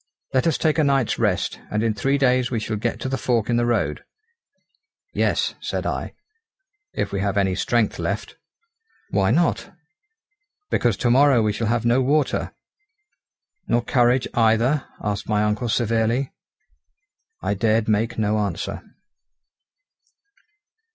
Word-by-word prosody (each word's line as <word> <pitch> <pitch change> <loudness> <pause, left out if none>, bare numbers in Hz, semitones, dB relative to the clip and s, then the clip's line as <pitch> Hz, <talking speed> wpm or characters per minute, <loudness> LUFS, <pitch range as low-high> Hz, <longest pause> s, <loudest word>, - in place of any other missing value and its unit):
Let 130 +5 +2
us 160 - +2
take 155 -1 +1
a - - +4
night's 135 -4 +1
rest, - - 0
and 105 +1 -1
in 115 -1 +1
three 135 +7 0
days 125 -2 +2
we 120 - -1
shall 110 0 -3
get 115 +3 -2
to - - -2
the 135 -1 -2
fork 115 0 0
in 120 - +2
the 120 0 +1
road." 120 - -1 1.1
"Yes," - - 0
said - - -3
I, - - -3 0.8
"if - - -3
we 100 - -2
have 100 0 -1
any 95 -2 +2
strength 115 +3 0
left." - - -3 0.8
"Why 95 -1 +2
not?" 165 +7 +1 1.0
"Because 120 -5 +1
to 120 - +1
morrow 135 -2 +5
we 105 -1 +1
shall 115 +1 -2
have 120 +1 0
no 120 +2 +3
water." 145 +3 0 1.2
"Nor 120 - +1
courage 125 +1 +2
either?" 115 +5 +2 0.2
asked 100 -1 -3
my 105 0 +2
uncle 105 +3 -1
severely. 115 +3 0 1.1
I - - 0
dared 110 +2 +1
make 110 +2 0
no 110 -1 +1
answer. 100 -5 -3
115 Hz, 145 wpm, -22 LUFS, 105-130 Hz, 1.2 s, morrow